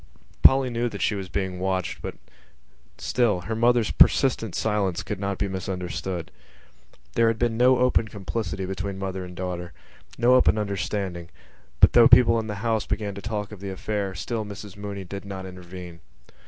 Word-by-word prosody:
Polly 135 -1 +6
knew 120 +1 -1
that 100 -3 -4
she - - +2
was 95 -2 -5
being 95 -2 -3
watched, 95 -1 -2
but - - -5 0.8
still 110 -7 +1
her 110 +5 -4
mother's 120 -1 +3
persistent 115 -7 +3
silence 105 -5 0
could 105 - -5
not 100 -1 -2
be 100 - -1
misunderstood. 90 -2 -4 0.8
There 115 - +3
had 115 0 +1
been 120 -1 0
no 125 +2 +5
open 125 -2 +2
complicity 95 -2 -4
between 95 +1 -4
mother 95 -1 -4
and 90 0 -9
daughter, 90 -1 -5 0.4
no 120 +1 +4
open 130 -3 +5
understanding 100 -4 -3 0.5
but, - - +7
though 120 -1 +8
people 115 -2 +6
in 110 - -4
the 105 - -4
house 110 -2 0
began 105 -1 -2
to 100 - -8
talk 105 0 -4
of 105 - -9
the 100 0 -6
affair, 100 0 -3
still 110 +5 -3
Mrs 105 -1 -9
Mooney 100 -1 -6
did 100 +2 -7
not 95 -1 -7
intervene. 90 -2 -10
100 Hz, 175 wpm, -25 LUFS, 95-110 Hz, 0.8 s, though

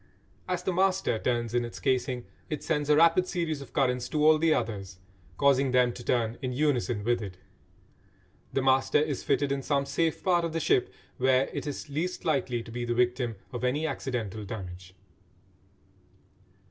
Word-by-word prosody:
As 180 -1 -2
the 185 - 0
"master" 185 - +1
turns 120 -1 -1
in 120 0 +2
its 120 - -7
casing 125 -1 0 0.2
it 150 - -4
sends 150 -3 -1
a 150 - +6
rapid 170 +3 +5
series 160 -5 -2
of 140 - -11
currents 125 -3 0
to 150 -1 +1
all 155 0 +6
the 165 0 +3
others, 100 -9 -2 0.4
causing 140 -1 +3
them 125 -1 +3
to 120 - -9
turn 115 -2 0
in 130 -1 -2
unison 125 -6 0
with 120 +1 +1
it. 95 -3 -7 1.1
The 135 - 0
"master" 130 0 +3
is 150 -2 0
fitted 145 -1 +1
in 140 0 -1
some 140 0 0
safe 155 +3 -1
part 175 -2 +3
of 165 -1 -2
the 165 - 0
ship 130 - +2 0.3
where 130 +1 +3
it - - -4
is 145 - -5
least 160 +6 -3
likely 130 -6 0
to 115 - -11
be 120 +1 -4
the 120 0 -1
victim 120 -1 +1 0.2
of 120 - -4
any 140 +5 +1
accidental 115 -9 -3
damage. 95 -3 -8
130 Hz, 180 wpm, -28 LUFS, 120-155 Hz, 1.1 s, a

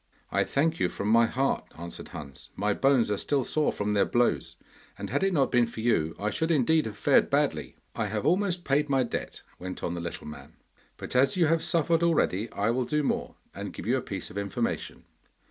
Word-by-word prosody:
'I - - +2
thank 160 +4 0
you - - +2
from 100 - -3
my 115 +1 +5
heart,' 135 +3 0
answered 85 +1 -8
Hans. 70 -3 -10
'My 105 +1 +1
bones 130 -2 +3
are 105 - 0
still 140 -3 0
sore 155 +4 +1
from 105 0 -2
their 100 - +4
blows, 120 - +1 0.4
and - - -6
had 145 - +1
it 195 0 +2
not 145 -6 +2
been 120 -2 +4
for 115 - -9
you 80 -9 +1
I 105 +1 -1
should 160 +8 -1
indeed 155 -1 +3
have 105 -1 -7
fared - - +4
badly.' - - 0 0.2
'I 110 - -1
have 105 +3 -3
almost 180 +2 +1
paid 145 +1 +1
my 135 -2 +3
debt,' 120 - -5 0.2
went 95 0 -6
on 85 - -1
the 85 - -4
little 85 0 -6
man, 75 - -10 0.4
'but - - -7
as 135 +6 +3
you 175 - +4
have 165 +1 +2
suffered 165 0 +1
already, 120 - +1
I 105 +3 0
will 125 +1 0
do 150 +2 0
more, - - -2 0.2
and - - -6
give - - -8
you - - +2
a - - 0
piece - - -6
of 100 - -4
information. 100 -2 -3
125 Hz, 220 wpm, -28 LUFS, 105-150 Hz, 0.4 s, my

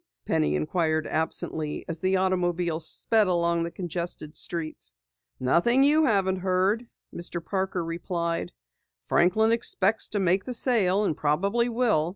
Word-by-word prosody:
Penny 75 -1 +1
inquired 155 - 0
absently 155 -1 -2
as 165 -1 -4
the 190 +2 +1
automobile 175 -3 0
sped 210 +6 +1
along 170 -1 +1
the 170 - -2
congested 170 -3 -5
streets. 165 -2 -4 0.4
"Nothing 205 - +3
you 305 +2 +4
haven't 195 -6 +2
heard," 190 +5 0 0.3
Mr. 170 0 -5
Parker 190 -3 -2
replied. 170 0 -3 0.6
"Franklin 220 +6 +3
expects 220 -2 +1
to 205 - -2
make 190 +1 +2
the 250 - -3
sale 210 -6 +2
and 165 - 0
probably 200 +12 +1
will. 225 -10 +1
180 Hz, 135 wpm, -26 LUFS, 165-205 Hz, 0.6 s, you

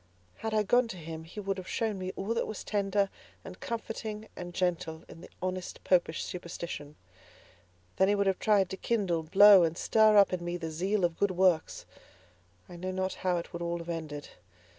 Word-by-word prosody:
Had 220 0 -4
I 215 - +3
gone 245 +4 +3
to 190 - -7
him, 160 -1 -7
he 175 +6 -9
would 195 -1 -2
have 185 - -9
shown 220 -4 -1
me 185 0 -3
all 200 +4 -2
that 230 - -1
was 215 - -6
tender, 200 -1 0 0.3
and 185 -1 -9
comforting, 220 -1 -5
and 175 0 -7
gentle, 170 -3 -2
in 165 - -12
the - - -12
honest 185 0 -4
Popish 175 -3 +2
superstition. 170 -4 -6 1.0
Then 190 - +4
he 205 - +3
would 200 0 +1
have 190 -1 +1
tried 200 -4 +3
to 190 - -4
kindle, 190 -7 0
blow 195 +4 +8
and 165 0 0
stir 215 +1 +4
up 200 -2 +6
in 175 -1 -2
me 175 0 -3
the 165 -2 -5
zeal 190 +4 0
of 170 -1 -3
good 200 - +3
works. 185 -3 +1 0.8
I 175 - -10
know 185 +2 -4
not 190 0 -2
how 180 -1 +1
it 170 - -6
would 170 - -5
all 170 0 -1
have 170 0 -8
ended. 155 -3 -5
185 Hz, 205 wpm, -30 LUFS, 170-205 Hz, 1.0 s, blow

